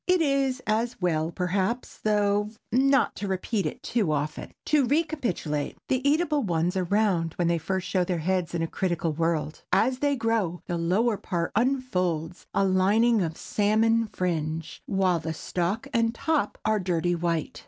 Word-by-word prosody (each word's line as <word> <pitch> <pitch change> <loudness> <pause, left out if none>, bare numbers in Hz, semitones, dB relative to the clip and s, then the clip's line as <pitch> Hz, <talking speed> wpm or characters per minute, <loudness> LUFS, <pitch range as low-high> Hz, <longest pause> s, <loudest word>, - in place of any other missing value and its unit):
It 365 0 +4
is 275 -4 +1
as 225 +3 0
well 160 -3 0
perhaps, 190 +7 -2
though, 205 -1 +1 0.2
not 270 +3 +3
to 205 - -3
repeat 190 0 -1
it - - -7
too 210 -9 0
often. 150 +1 -3
To 295 -4 +3
re 300 +6 +3
capitulate.—The 255 - -2
eatable 300 -1 +2
ones 175 -4 0
are 185 -1 0
round 185 -4 +1
when 175 - 0
they 170 -1 +1
first 190 +3 -2
show 185 -2 +1
their 180 0 -1
heads 175 +1 -1
in 165 - 0
a - - -1
critical 170 -3 -1
world. 160 -1 -1
As 255 0 +2
they 285 0 +2
grow, 225 -8 -1
the 175 -1 -2
lower 205 +7 +1
part 170 -3 -2
unfolds 185 - -1
a - - +2
lining 205 +5 +3
of 160 -2 -2
salmon 225 +2 +2
fringe, 165 -4 -3
while 190 -3 +2
the 160 0 -4
stalk 185 - -2
and 230 -1 +2
top 300 -5 0
are 215 -1 +2
dirty 175 -2 0
white. 170 -2 -2
190 Hz, 165 wpm, -26 LUFS, 170-230 Hz, 0.2 s, It